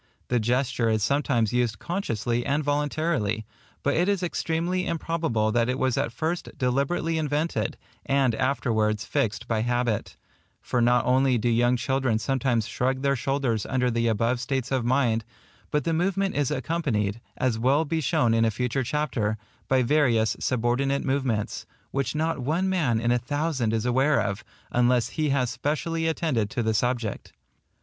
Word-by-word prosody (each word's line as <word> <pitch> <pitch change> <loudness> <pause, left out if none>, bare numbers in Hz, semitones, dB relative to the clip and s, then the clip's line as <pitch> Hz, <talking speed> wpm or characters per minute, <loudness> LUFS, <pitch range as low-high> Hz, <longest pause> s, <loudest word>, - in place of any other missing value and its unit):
The 125 - +2
gesture 120 0 +1
is 110 -2 +1
sometimes 130 -5 +1
used 120 -4 +1
consciously 120 - -2
and 145 +4 0
voluntarily, 145 -6 0 0.4
but 140 - +2
it 175 +4 +2
is 200 -3 0
extremely 175 +1 -1
improbable 160 -10 0
that 115 +1 +1
it 130 - 0
was 130 -2 +1
at 115 - -1
first 160 +8 -3
deliberately 140 +6 0
invented, 150 +2 -1 0.3
and 135 -3 +2
afterwards 110 -4 0
fixed 110 -1 -1
by 110 -2 0
habit; 120 -2 -1 0.4
for 125 - -1
not 120 +1 +3
only 130 0 +3
do 115 - -1
young 120 +1 +3
children 130 -1 0
sometimes 120 -1 0
shrug 130 +3 -1
their 140 0 +2
shoulders 130 -4 -1
under 125 -2 +1
the 115 0 +1
above 115 +3 +1
states 135 0 -2
of 130 -2 +1
mind, 120 -2 +2 0.5
but 150 -1 0
the 165 - 0
movement 195 +3 0
is 145 -3 0
accompanied, 125 -7 -1 0.2
as 125 -4 0
will 140 +7 +3
be 160 +1 -1
shown 120 -4 +2
in 115 0 +3
a 115 - +3
future 125 +4 -1
chapter, 120 -6 -1 0.3
by 130 -1 +3
various 120 -5 +2
subordinate 130 +3 0
movements, 130 -6 -1 0.2
which 140 +2 -1
not 160 0 0
one 160 +9 0
man 150 -12 +1
in 115 +1 +1
a 125 - +3
thousand 145 -2 -1
is 115 0 -1
aware 135 +4 +3
of, 100 0 -2 0.3
unless 125 0 +2
he 155 -1 -1
has 130 -3 +1
specially 155 +5 -1
attended 150 -10 0
to 125 -3 -2
the 110 0 +1
subject. 120 -1 -2
130 Hz, 165 wpm, -26 LUFS, 115-145 Hz, 0.5 s, not